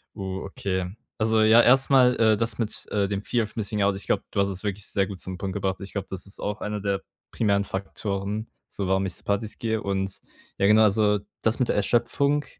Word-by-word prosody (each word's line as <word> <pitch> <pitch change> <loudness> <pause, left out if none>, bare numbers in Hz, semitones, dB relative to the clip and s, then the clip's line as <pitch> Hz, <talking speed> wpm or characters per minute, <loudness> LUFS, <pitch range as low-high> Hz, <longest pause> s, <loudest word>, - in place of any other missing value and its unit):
Oh, 95 -2 -4
okay. 95 -1 -3 0.3
Also 110 0 +2
ja, 110 +2 +7
erstmal, 130 0 +5
äh, 110 -2 +5
das 115 +1 0
mit 110 -3 -3
äh 100 -1 +1
dem 100 0 -2
Fear 120 0 +1
of 105 - -8
Missing 105 -1 -2
Out, 100 0 +2
ich 95 - -5
glaube, - - +1
du - - -1
hast 100 - +3
es 95 0 -5
wirklich 100 -1 -3
sehr 100 -1 +1
gut 95 -2 -7
zum 95 -1 -6
Punkt 95 -1 -4
gebracht. 95 -1 -1
Ich 100 - -7
glaube, 100 - -4
das 95 -1 -4
ist 100 - -8
auch 105 0 -3
einer 105 0 -3
der 100 -1 -1 0.3
primären 100 -2 +1
Faktoren, 100 +2 -3 0.2
so 100 -2 -4
warum 95 0 +2
ich 95 - -4
zu - - -10
Partys 100 +1 -1
gehe 110 -1 -1
und, 95 -1 -2 0.4
ja 100 - +3
genau, 110 +1 +6
also 105 0 +3 0.2
das 110 +3 +1
mit 125 - +2
der - - +1
Erschöpfung, 140 +7 +1
100 Hz, 230 wpm, -25 LUFS, 95-110 Hz, 0.4 s, ja